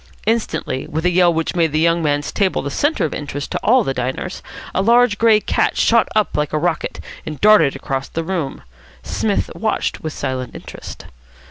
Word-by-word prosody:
Instantly, 165 - -1
with 160 +2 -3
a 180 - +4
yell 175 0 +4
which 165 +1 -2
made 165 -3 +2
the 155 - +1
young 170 +1 +3
man's 145 -1 0
table 190 -7 0
the 140 - -4
centre 290 - +1
of 155 - -3
interest 145 -1 -5
to - - -1
all 250 +2 +4
the 135 - -1
diners, 130 +9 -4 0.3
a - - +1
large 235 0 +4
grey 225 -2 +5
cat - - 0
shot 230 -1 +4
up 215 -1 +1
like 150 0 -1
a - - +2
rocket, 165 +1 -1 0.2
and 155 -2 -7
darted 205 -10 +5
across 135 -1 -3
the 165 - -4
room. 165 -6 -3 0.4
Psmith 210 -2 -1
watched 220 0 -2
with 155 - -4
silent 130 -3 -4
interest. - - -9
165 Hz, 195 wpm, -19 LUFS, 145-210 Hz, 0.4 s, grey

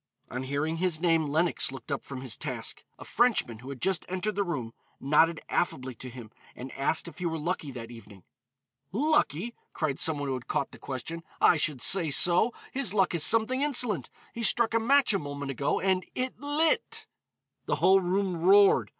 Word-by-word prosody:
On 125 - -4
hearing 145 +5 -2
his 175 -2 0
name, 165 -3 +2
Lenox 160 0 +1
looked 135 0 -10
up 140 - -2
from 135 -2 -8
his 130 -4 -1
task. - - -4
A - - -11
Frenchman 225 - +1
who 130 +3 -10
had 135 -2 -7
just 190 +1 0
entered 185 +3 -2
the 200 - 0
room 135 -11 -4 0.3
nodded 155 +3 +2
affably 130 -6 -2
to 125 +2 -8
him 120 -3 -11 0.2
and 130 +1 -8
asked 140 +5 -1
if 165 0 -11
he 180 - -1
were 165 -1 -3
lucky 160 -1 -3
that 120 -3 -8
evening. 105 -5 -14 0.7
"Lucky!" 240 - 0 0.2
cried 145 -4 -2
some 160 -2 +4
one 145 0 -4
who 135 - -1
had 125 -2 -6
caught 140 - -2
the - - -14
question, 140 +6 -6 0.2
"I - - +5
should 145 -5 0
say 170 +3 +5
so. 175 - +5 0.2
His 255 -7 0
luck 190 -3 +2
is 170 -3 +2
something 225 +4 +3
insolent; 245 -7 +2 0.2
he 230 - -6
struck 230 0 +2
a 230 - +3
match 265 +1 +3
a 195 - +1
moment 145 -1 -5
ago 140 +2 -1
and 190 -1 +1
it 255 0 -3
lit." 315 - 0 0.6
The - - +1
whole 190 0 +4
room 185 0 -1
roared. 195 +3 +5
165 Hz, 195 wpm, -28 LUFS, 135-200 Hz, 0.7 s, I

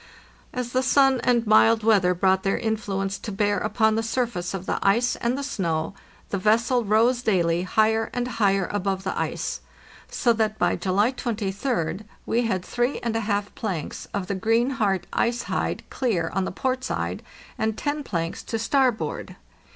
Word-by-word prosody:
As 250 -2 -4
the 255 - +2
sun 270 -1 +4
and 240 -1 +2
mild 220 +1 +5
weather 195 -5 +4
brought 190 +1 +3
their 195 - 0
influence 200 -3 -2
to 215 - -6
bear 205 0 +1
upon 220 +2 +2
the 225 - +1
surface 225 -6 -2
of 190 -1 -6
the - - -1
ice 235 +5 +3
and 240 +2 -1
the 280 - -3
snow, 170 - -2 0.4
the 200 - -1
vessel 230 +5 +2
rose 230 +4 +3
daily 175 -6 +1
Ligher 220 +2 +2
and 245 0 -2
higher 200 -6 +1
above 195 -1 -1
the 190 - -2
ice, - - -3 0.5
so 235 - +2
that 215 -1 0
by - - +2
July 200 +5 +1
23d 215 - -2 0.2
we 235 - +1
had 185 -4 -1
three 245 +3 0
and 230 -2 -2
a - - +2
half 205 -2 -2
planks 185 -9 -4
of 200 -2 -2
the 200 - -3
greenheart 225 -1 +1
ice 235 +1 +1
hide - - -2
clear 195 -11 -1
on 190 +1 0
the - - -3
port 255 +5 -2
side - - -3 0.4
and 220 0 0
ten 290 0 -2
planks 170 -8 -3
to 225 - -3
starboard. 230 - 0
215 Hz, 175 wpm, -24 LUFS, 195-240 Hz, 0.5 s, mild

